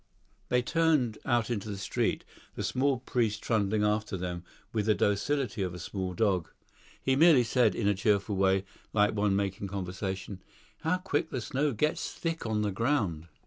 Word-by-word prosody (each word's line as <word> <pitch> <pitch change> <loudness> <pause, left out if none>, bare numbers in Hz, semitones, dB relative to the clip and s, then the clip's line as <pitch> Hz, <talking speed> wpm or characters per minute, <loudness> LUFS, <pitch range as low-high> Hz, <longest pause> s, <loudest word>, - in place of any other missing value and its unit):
They 125 0 +2
turned 150 -7 +2
out 120 0 +1
into 110 -2 -3
the 100 - -4
street, 95 - -1 0.3
the - - -3
small 135 +1 +1
priest 115 -4 -1
trundling 105 -2 +1
after 105 -1 0
them 90 -1 -4 0.3
with 110 -2 0
the 110 - +4
docility 115 +3 0
of 90 -2 -2
a - - -7
small 95 0 -4
dog. 95 -6 +1 0.5
He 130 - +1
merely 155 -3 +6
said, 120 -1 +2
in 105 - 0
a 105 - +4
cheerful 100 +1 +1
way, 95 0 +2 0.3
like 105 0 +3
one 105 -2 +1
making 100 0 -1
conversation, 95 0 -4 0.4
"How 165 +3 +1
quick 185 -5 -1
the 130 - -3
snow 140 +5 0
gets 150 +8 0
thick 165 -7 -3
on 105 -1 0
the 105 - 0
ground." 100 - 0
105 Hz, 175 wpm, -29 LUFS, 95-125 Hz, 0.5 s, merely